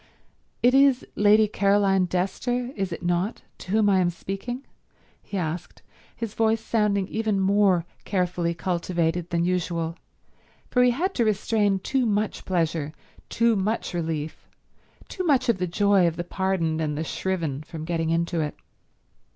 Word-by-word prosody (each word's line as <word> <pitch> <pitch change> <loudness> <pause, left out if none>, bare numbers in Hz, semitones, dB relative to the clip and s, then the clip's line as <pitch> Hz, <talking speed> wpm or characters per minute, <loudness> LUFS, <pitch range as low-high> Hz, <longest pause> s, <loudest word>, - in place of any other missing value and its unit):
"It 245 +1 +5
is 270 -1 +4
Lady 210 +1 +5
Caroline 200 -2 +2
Dester, 245 +8 -2
is 195 -3 -2
it 165 - -6
not, 175 +5 -1 0.2
to - - -11
whom 215 0 +3
I 195 -2 +4
am 180 -1 +3
speaking?" 195 +9 -5 0.6
he 200 - -6
asked, 170 -1 -4 0.3
his 230 -3 -5
voice 225 0 +2
sounding 210 -4 0
even 220 -2 -1
more 195 -3 +3 0.2
carefully 175 -3 -1
cultivated 170 -1 -1
than 170 0 0
usual, 170 -2 -1 0.8
for 250 - +3
he 250 - +6
had 345 +11 0
to 240 - +1
restrain 205 -1 +1
too 250 +6 0
much 210 0 -1
pleasure, 165 -4 -1 0.4
too 230 -1 +2
much 210 +1 -1
relief, 160 -3 -4 0.6
too 370 - -4
much 275 -8 +2
of 215 -5 +2
the 180 - 0
joy 195 0 +3
of 165 - -1
the 175 - -3
pardoned 175 -3 -1
and 150 -2 -2
the 160 - -1
shriven 165 -5 -2
from 155 0 -8
getting 165 -1 -1
into 170 +1 0
it. 150 -1 -3
190 Hz, 155 wpm, -25 LUFS, 170-215 Hz, 0.8 s, he